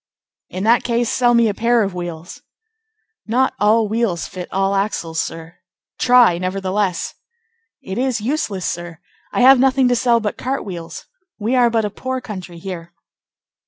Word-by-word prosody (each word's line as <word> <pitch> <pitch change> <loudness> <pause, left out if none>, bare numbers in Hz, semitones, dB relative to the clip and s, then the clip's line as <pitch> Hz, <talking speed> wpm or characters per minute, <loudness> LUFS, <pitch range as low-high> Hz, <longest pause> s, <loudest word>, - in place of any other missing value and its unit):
"In 185 - -5
that 230 +3 +4
case, 235 -1 0
sell 240 -1 +3
me 235 -1 +4
a 210 - 0
pair 235 +2 +2
of 195 -2 -3
wheels." 175 -1 -7 0.9
"Not 255 +4 +1
all 215 +2 +3
wheels 215 -5 -1
fit 180 -1 -8
all 195 +1 +1
axles, 195 -5 -2
sir." 165 +1 -5 0.4
"Try, 245 -8 +5
nevertheless." 190 0 -2 0.7
"It 190 +4 -4
is 255 -2 0
useless, 210 - -2
sir. 175 -1 -5 0.3
I - - 0
have 260 +1 +7
nothing 265 0 +3
to 245 - +3
sell 240 -1 +3
but 215 -2 -4
cart 265 +2 -3
wheels. 170 -4 -7 0.3
We 225 +4 -1
are 245 -2 +4
but 225 -2 +1
a 205 - -3
poor 260 +4 -4
country 185 -7 -8
here." 170 -1 -8
210 Hz, 160 wpm, -19 LUFS, 180-240 Hz, 0.9 s, have